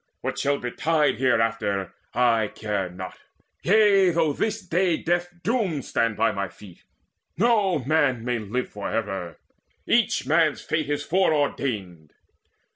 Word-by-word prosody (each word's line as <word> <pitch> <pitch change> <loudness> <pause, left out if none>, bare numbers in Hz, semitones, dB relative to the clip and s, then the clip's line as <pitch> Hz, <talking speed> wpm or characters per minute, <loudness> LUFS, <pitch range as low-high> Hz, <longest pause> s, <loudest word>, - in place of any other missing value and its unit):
What - - -3
shall 140 0 +1
betide 150 +5 0
Hereafter, 115 -6 0 0.2
care - - -27
I 110 -4 +1
not 95 +1 -8 0.4
yea, 200 -1 +5
though 165 -3 +1
this 220 +7 -1
day 175 -1 +1
Death's 175 +1 -1
doom 200 - 0
stand 115 -2 0
by 115 +1 +3
my 100 -1 -3
feet: 90 +1 -15 0.6
no 205 -4 +3
man 135 -6 +1
may 125 -1 0
live 110 +4 -3
For 105 - -5
ever: 95 -6 -3 0.5
each 235 -1 +2
man's 155 -1 +2
fate 155 -2 -2
is 145 0 -1
foreordained." 135 - -1
140 Hz, 130 wpm, -24 LUFS, 110-175 Hz, 0.6 s, yea